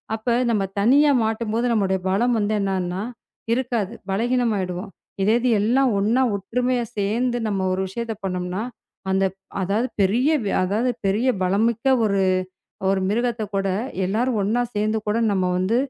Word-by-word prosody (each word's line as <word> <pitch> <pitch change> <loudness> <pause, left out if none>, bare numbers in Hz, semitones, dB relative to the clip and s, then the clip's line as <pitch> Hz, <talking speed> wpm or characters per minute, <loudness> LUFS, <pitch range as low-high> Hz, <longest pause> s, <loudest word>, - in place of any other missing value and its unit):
அப்ப 220 +2 -12 0.2
நாம 205 -4 +1
தனியா 285 +6 +5
மாட்டும்போது, 225 +1 -1
நம்முடைய 190 -3 +1
பலம் 235 +5 +2
என்னன்னாகும்னா, 195 -3 -1 0.5
இருக்காது. 235 -4 -1 0.2
பலவீனமாகிடுவோம். 205 -4 -1 0.3
இதேது 230 +5 +2
எல்லாம் 255 +5 +3
ஒண்ணா, 230 +6 +2
ஒற்றுமையா 245 +5 -1
சேர்ந்து 235 +5 0
நாம 195 -3 -1
ஒரு 190 - -1
விஷயத்தை 225 +3 -4
பண்ணோம்னா, 180 +1 -2 0.5
அந்த 190 0 +2 0.4
அதாவது 205 +7 0
பெரிய 230 +9 +3 0.3
அதாவது 215 +7 +1 0.2
பெரிய 215 +7 +1 0.2
பலமிக்க 220 +5 +1 0.2
ஒரு 200 -2 +1 0.7
ஒரு 195 - +1
மிருகத்தைக் 225 -1 -1
கூட 195 0 0 0.4
எல்லாரும் 230 +4 0
ஒண்ணா 225 +5 +1
சேர்ந்து 215 +1 0
கூட 210 +2 +1
நாம 185 -2 +1
வந்து 190 +5 +1
215 Hz, 130 wpm, -23 LUFS, 195-240 Hz, 0.7 s, தனியா